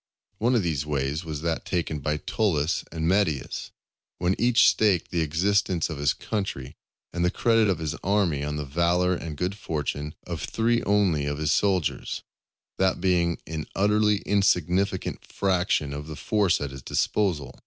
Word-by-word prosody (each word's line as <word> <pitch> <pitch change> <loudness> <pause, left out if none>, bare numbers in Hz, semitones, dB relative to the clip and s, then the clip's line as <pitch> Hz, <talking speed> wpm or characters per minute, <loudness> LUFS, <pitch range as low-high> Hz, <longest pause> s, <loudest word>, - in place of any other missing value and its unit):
One 120 +3 +2
of 115 - +2
these 80 -5 -1
ways 75 +2 -2
was 80 -3 -5
that 85 -1 -1
taken 85 -4 -2
by 75 +2 -1
Tullus 80 -4 0
and 80 -1 -2
Metius, 85 -7 0 0.5
when 90 +1 +1
each 120 +1 +5
staked 100 -6 +2
the 85 - +1
existence 85 +2 +1
of 75 - -5
his 70 - +3
country 95 - -4 0.4
and 85 - -1
the 90 - +3
credit 115 +2 +3
of 95 - +1
his 80 -2 -3
army 95 -7 +1
on 75 0 -3
the 75 -1 -3
valour 85 +5 +2
and 80 -4 -5
good 90 +4 -1
fortune 75 -5 -4
of 85 -4 -5
three 115 +6 +1
only 95 -8 +2
of 70 0 -2
his 75 -1 0
soldiers, 95 -5 0 0.6
that 95 0 +2
being 85 -2 +2
an 80 -1 -5
utterly 105 +1 +3
insignificant 95 -1 +1
fraction 90 -7 0
of 75 +1 -6
the 80 - -6
force 100 0 +1
at 70 -2 -3
his 70 -1 -9
disposal. 75 - -1
85 Hz, 165 wpm, -26 LUFS, 75-100 Hz, 0.6 s, each